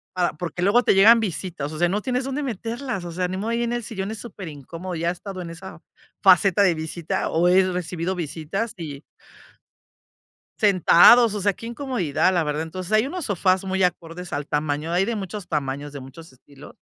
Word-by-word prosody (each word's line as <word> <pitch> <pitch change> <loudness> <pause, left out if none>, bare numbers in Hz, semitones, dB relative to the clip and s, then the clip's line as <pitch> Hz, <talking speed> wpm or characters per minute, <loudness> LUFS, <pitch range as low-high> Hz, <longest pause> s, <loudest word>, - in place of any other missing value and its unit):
Para 180 -1 +1
porque 175 +2 -5
luego 205 +7 +4
te - - +4
llegan 215 +5 +7
visitas, 175 -7 -4
o 155 - -7
sea, 175 - +3
no 200 +4 -1
tienes 255 +3 -1
dónde 270 +2 -3
meterlas, 235 -3 -4
o 170 - -6
sea, 180 +1 -1
ni 185 - -4
modo, 210 +4 -3
ahí 235 +1 0
en 235 - -2
el 240 - -2
sillón 200 -2 -4
es 220 - -5
super 205 -6 -8
incómodo, 165 +5 -7
ya 165 +1 -2
he - - +2
estado 185 +1 -8
en 170 - -7
esa 175 +1 -10 0.4
faceta 195 0 +5
de 185 -3 +4
visita, 165 +4 -3
o 170 +2 +2
he 185 +1 +4
recibido 180 0 -3
visitas 175 +5 -4
y 150 -5 -7 1.6
sentados, 210 +3 +6
o 205 - -3
sea, 200 +1 +2
qué 230 - -11
incomodidad, 235 - 0
la 175 -2 +2
verdad. 150 0 -2
Entonces, 175 +4 -6
hay 215 +4 +3
unos 355 +1 -4
sofás 185 -2 +1
muy 190 0 -2
acordes 180 0 -3
al 145 0 -3
tamaño, 150 +2 -2
hay 180 +3 +2
de 235 +2 -2
muchos 195 -1 -6
tamaños, 145 -2 -3
de 140 - -8
muchos 135 +4 -12
estilos. 135 +2 -16
185 Hz, 205 wpm, -23 LUFS, 165-210 Hz, 1.6 s, llegan